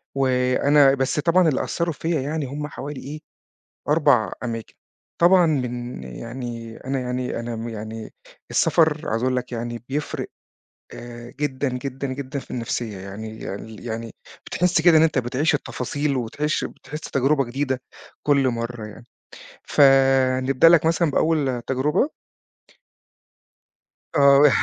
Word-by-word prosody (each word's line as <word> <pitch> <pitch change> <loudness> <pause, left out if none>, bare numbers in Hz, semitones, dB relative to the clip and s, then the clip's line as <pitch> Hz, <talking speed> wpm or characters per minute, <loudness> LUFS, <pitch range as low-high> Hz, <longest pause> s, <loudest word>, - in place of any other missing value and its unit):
وأنا 135 +2 +4
بس 135 +2 0
طبعًا، 170 +3 +4
اللي 140 - 0
أثَّروا 170 -1 -1
فيَّا 160 0 -1
يعني، 150 +2 -2
هم 145 +3 -5
حوالي 145 -1 -7
إيه، 145 +3 -7 0.7
4 145 -7 +3
أماكن. 115 -2 -5 0.5
طبعًا 175 +1 +6
من 125 - -2
يعني 115 - -7
أنا 135 0 -1
يعني 125 -1 -3
أنا 120 0 -4
م 115 +1 -5
يعني، 110 0 -7 0.4
السفر، 160 -2 +2
عايز 115 +2 -1
أقول 130 0 +1
لك 125 0 -4
يعني، 120 0 -5
بيفرق 145 +2 -3 0.6
آآ، 120 0 -9
جدًا 140 -1 -1
جدًا 130 +1 -4
جدًا 135 +1 -4
في - - -10
النفسية، 115 -3 -3
يعني 105 +2 -7
ال 110 +2 -10
يعني، 115 0 -5 0.3
بتحِس 180 -1 +1
كده 165 0 +6
إن 155 - +6
أنت 160 -4 +2
بتعيش 130 +6 +1
التفاصيل 145 +1 -2
وتعيش 140 +5 -1
بتحِس 150 - -8
تجربة 140 0 +1
جديدة 130 +1 -2 0.4
كل 140 -2 +3
مرّة 115 -2 -4
يعني. 110 +3 -12 0.6
فنبدأ 135 +1 +4
لك 165 -2 +5
مثلًا 165 -1 +2
بأول 140 -5 +1
تجربة. 135 - +1 2.1
آه. 140 0 +7
130 Hz, 130 wpm, -23 LUFS, 120-150 Hz, 2.1 s, آه